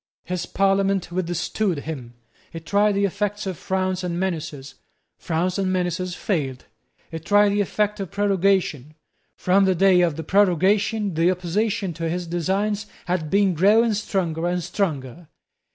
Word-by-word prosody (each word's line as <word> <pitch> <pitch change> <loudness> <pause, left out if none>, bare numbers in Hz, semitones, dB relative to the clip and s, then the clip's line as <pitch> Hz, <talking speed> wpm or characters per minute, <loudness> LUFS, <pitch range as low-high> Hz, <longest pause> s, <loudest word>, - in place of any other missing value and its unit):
His 180 0 -4
Parliament 195 -2 +1
withstood 175 +1 -1
him. 130 -7 -7 0.4
He 165 - -6
tried 205 +5 +2
the 200 0 +2
effects 205 +1 -2
of 190 -2 -3
frowns 185 +1 -2
and 175 -1 -2
menaces. 155 -7 -4 0.5
Frowns 180 +2 -1
and 190 -1 0
menaces 180 0 -1
failed. 140 -12 -2 0.5
He 165 - -5
tried 205 +5 +4
the 205 +1 +1
effect 210 +1 -1
of 195 -3 -4
prorogation. 190 -7 0 0.4
From 195 +2 +3
the 190 -1 +2
day 185 0 +5
of 170 -4 +1
the 160 - -5
prorogation 200 +3 +2
the 165 +2 +2
opposition 190 +2 -1
to 165 0 -3
his 175 +1 -3
designs 195 +5 -1 0.2
had 175 -3 -2
been 200 0 +3
growing 215 +7 +4
stronger 175 -5 -1
and 175 0 -1
stronger. 155 - -3
185 Hz, 150 wpm, -23 LUFS, 170-200 Hz, 0.5 s, day